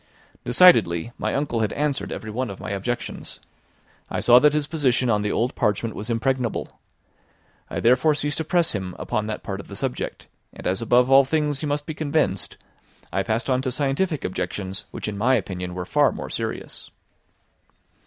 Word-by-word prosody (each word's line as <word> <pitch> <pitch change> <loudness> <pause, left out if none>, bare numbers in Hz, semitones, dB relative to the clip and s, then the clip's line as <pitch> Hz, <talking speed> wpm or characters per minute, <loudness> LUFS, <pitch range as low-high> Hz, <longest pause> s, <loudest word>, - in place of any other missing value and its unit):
Decidedly, 120 - +5
my - - -1
uncle 140 -4 -1
had 110 -2 0
answered 145 -1 -1
every 110 - -5
one 125 +2 -2
of 100 - -8
my - - -5
objections. 120 +5 -4 0.7
I - - -2
saw 120 0 +7
that 150 +2 +5
his 150 0 0
position 130 -6 +1
on 105 -1 +2
the 105 0 -1
old 120 +3 0
parchment 110 0 0
was 105 +4 -6
impregnable. 120 0 -1 0.9
I - - -3
therefore 135 +6 +4
ceased 145 +1 -2
to - - 0
press 170 +1 +2
him 95 -3 -4
upon 105 0 -2
that 110 - -4
part 100 -1 -4
of - - -9
the 100 - -9
subject, 130 +4 -4 0.3
and - - -11
as 95 +5 0
above 125 +3 +3
all 135 +1 +8
things 150 0 0
he 150 - -2
must 145 0 -1
be 155 - -4
convinced, 150 - -1 0.6
I 95 - +1
passed 110 +3 -1
on 130 -1 +2
to 130 - -1
scientific 145 +4 0
objections, 95 +1 -4
which - - -6
in 100 -1 -4
my 130 +5 +4
opinion 90 -4 -3
were 90 -1 -4
far - - +3
more - - -7
serious. - - -5
125 Hz, 185 wpm, -24 LUFS, 105-145 Hz, 0.9 s, all